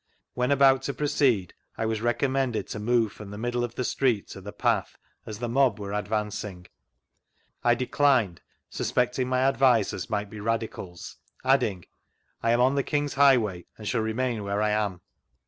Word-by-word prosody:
When 125 +1 0
about 135 -1 +5
to 140 - -3
jwoceed, 130 - +1 0.2
1 110 - -2
was 110 -1 -2
recommended 130 0 0
to - - -5
move 115 0 +2
from 105 -2 -11
the 105 - -8
middle 120 +2 -1
of 120 0 -4
the 125 - -2
street 125 -4 0
to 95 - -9
the 105 +2 -8
path, - - 0 0.3
as 110 - -6
the 120 +2 -3
mob 125 -3 +2
were 100 0 -5
advancing. 105 -3 -3 1.0
I 120 0 +4
declined, 125 - +2 0.3
suspecting 125 +1 -1
my 130 0 +1
advisers 120 - +2
might 105 -1 -2
be 105 - -8
radicals, 110 -5 -4 0.3
adding: 110 -10 +2 0.3
" - - -45
I 115 - 0
am 120 +1 +3
on 130 +2 +4
the 140 - +2
King's 145 +1 -1
highway, 120 -10 +3
and 105 - -8
shall 115 0 0
remain 110 0 -1
where 100 0 -2
I 105 - +2
am." 105 -4 -1
115 Hz, 175 wpm, -26 LUFS, 105-130 Hz, 1.0 s, about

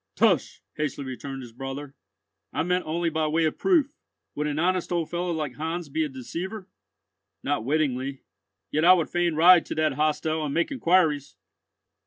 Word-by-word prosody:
"Tush!" - - +2 0.2
hastily 145 -2 -2
returned 135 +1 -6
his 120 - -11
brother, 135 +3 -7 0.6
"I - - -1
meant 180 +1 0
only 165 +1 0
by 155 0 0
way 160 +2 +2
of 155 - -2
proof. 325 -8 +3 0.4
Would 150 +1 -2
an 150 0 -2
honest 180 +2 0
old 170 -2 -1
fellow 175 +1 -1
like 155 -6 -3
Heinz 165 +1 -3
be 160 +3 0
a 150 - -2
deceiver?" 180 - -6 0.8
"Not - - -1
wittingly. 135 -1 -1 0.5
Yet 155 - +1
I 180 +2 +9
would 170 -4 0
fain 175 -2 +1
ride 175 +2 +7
to - - -4
that 155 -2 +1
hostel 155 +2 0
and 145 -2 -3
make 170 - +1
inquiries!" 165 - +2
155 Hz, 175 wpm, -26 LUFS, 145-175 Hz, 0.8 s, I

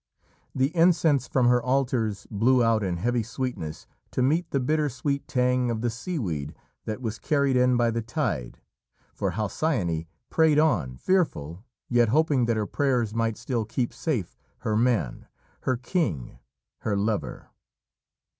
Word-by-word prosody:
The 135 +6 +1
incense 165 -5 +4
from 130 -2 +2
her 125 0 +4
altars 125 -5 0
blew 120 +4 +3
out, 115 -1 +3
in 90 -3 -1
heavy 120 +6 0
sweetness, 115 - -5 0.2
to 125 - 0
meet 160 +7 +1
the 140 - 0
bitter 150 +3 +1
sweet 140 +2 -2
tang 125 -1 +1
of 115 -2 -2
the 120 0 0
seaweed 105 - -4 0.3
that 110 +4 -4
was 115 -1 -3
carried 140 -3 +1
in 125 0 +4
by 120 -1 +2
the 115 +1 -1
tide, 115 - -3 0.6
for - - -2
Halcyone 100 - -1 0.2
prayed 160 -2 +4
on, 100 - +2
fearful, 95 - 0 0.2
yet 120 -2 +3
hoping 145 -1 +3
that 115 -1 +1
her 105 - 0
prayers 125 -4 0
might 115 -1 0
still 120 -4 -2
keep 120 +3 -2
safe 125 - -3 0.2
her 110 - -1
man 115 - 0 0.4
her 130 -1 +1
king 120 - -2 0.4
her 100 -2 -1
lover. 105 +1 -2
120 Hz, 150 wpm, -26 LUFS, 110-140 Hz, 0.6 s, incense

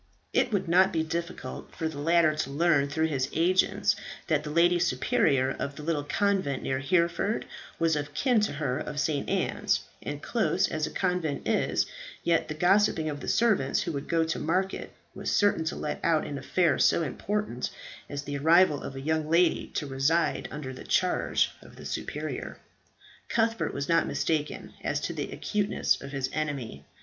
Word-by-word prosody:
It 245 - +2
would 195 -3 0
not 185 +3 +5
be 160 -1 0
difficult 165 -5 -5
for 160 - -2
the 155 -3 -6
latter 165 +1 +4
to 150 -3 -2
learn 145 -1 +2
through 160 +2 +1
his 135 -4 -1
agents 185 +4 +2 0.3
that 155 -3 +1
the 150 - -5
lady 175 +3 +4
superior 135 -3 +2
of 140 +1 -4
the 150 - -8
little 155 -2 0
convent 190 -4 0
near 130 0 -1
Hereford 170 +7 +1 0.3
was 165 -1 +2
of 145 0 -4
kin 250 - +3
to 210 - 0
her 140 -2 -1
of 150 -1 -4
St. 145 -1 -1
Anne's, - - 0 0.2
and, - - -5
close - - +1
as 155 0 -2
a - - -5
convent 180 -6 -1
is, - - +1 0.4
yet 170 -1 +2
the 155 - -4
gossiping 175 -2 +3
of 145 - -6
the - - -8
servants 215 - +2
who 150 -5 -3
go 165 +2 +1
to 160 - -2
market 185 +4 -1 0.2
was - - -4
certain 205 -6 +2
to 160 - -2
let - - -3
out 160 -2 +2
an 140 -1 -5
affair 170 +6 +1
so 170 - +4
important 210 +9 -2 0.4
as 140 0 -4
the 140 0 -4
arrival 160 0 +5
of 135 - -7
a 135 - -5
young 155 +1 -1
lady 170 +1 +3
to 150 - -1
reside 140 +5 +1
under 145 -3 -6
the 130 - -9
charge 185 -1 +1
of - - -15
the - - -11
superior. - - -4 0.7
Cuthbert 225 0 +1
was 140 0 -3
not 165 0 +3
mistaken 155 -2 -2
as - - 0
to - - -3
the - - -4
acuteness 210 -1 0
of 140 - -8
his 135 -2 -1
enemy. 140 - -3
160 Hz, 180 wpm, -28 LUFS, 145-175 Hz, 0.7 s, not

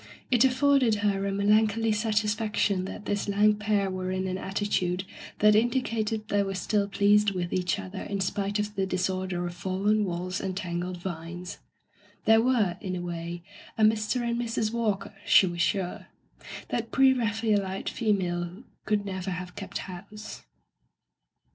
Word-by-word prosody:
It 245 -1 +5
afforded 265 -3 +4
her 200 -1 +1
a - - -1
melan 210 +2 +4
choly 225 +1 0
satisfaction 210 -2 0
that 205 - -7
this 205 0 -1
lank 210 +1 +3
pair 205 -2 +1
were 185 0 -3
in 185 0 -1
an 185 0 -2
attitude 190 -2 -1 0.3
that 210 0 +5
indicated 225 -2 0
they 205 -2 +2
were 195 -1 -2
still 200 +2 0
pleased 205 +1 +3
with 175 -1 -2
each 180 0 0
other 190 -1 -6
in 200 -1 -3
spite 200 +2 -1
of 210 0 -2
the 195 -2 -1
dis 185 0 0
order 185 -1 -3
of 175 - -4
fallen 195 +4 0
walls 180 0 -3
and 190 -1 -3
tangled 180 -1 -3
vines. 175 0 -6 0.7
They 225 0 +6
were, 225 -7 +2
in 185 -3 -3
a 180 - -3
way, 170 0 -5 0.3
a 220 - +2
Mr. 220 +3 +2
and 235 0 0
Mrs. 230 -2 -1
Walker, 215 -4 -1
she - - +6
was 175 -1 -2
sure. 180 +1 -1 0.6
That 230 -1 -2
pre 270 -1 +5
Raphaelite 210 -5 0
female 180 -2 -1 0.2
could 210 -1 0
never 190 -1 -4
have 180 0 -5
kept - - -5
house. 205 +4 -8
200 Hz, 160 wpm, -27 LUFS, 185-215 Hz, 0.7 s, They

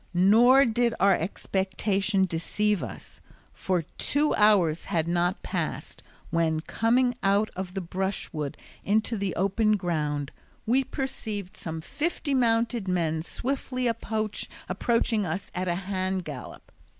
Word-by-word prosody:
Nor 235 +9 +6
did 235 0 +1
our 195 0 +5
expectation 195 +2 0
deceive 190 +4 0
us, - - -9 0.3
for 180 -3 -1 0.2
two 295 +2 +2
hours 195 -7 +4
had 165 -1 0
not 175 +2 0
passed - - -4 0.3
when, 160 -2 +1
coming 245 +7 +2
out 200 +2 +2
of 185 0 -5
the 195 - -1
brushwood 175 -5 -3 0.3
into 220 +3 +1
the 200 -3 -2
open 210 +3 +2
ground, 150 -6 -2 0.3
we 255 +4 +3
perceived 225 -8 -4
some 160 -1 -6
fifty 290 - -2
mounted 230 -3 +2
men 165 -3 0
swiftly 255 - -3
approaching 225 0 -1
us 180 +2 -4
at 185 +1 -2
a 175 - +1
hand 185 -1 -2
gallop. 140 -5 -9
195 Hz, 125 wpm, -27 LUFS, 175-230 Hz, 0.3 s, Nor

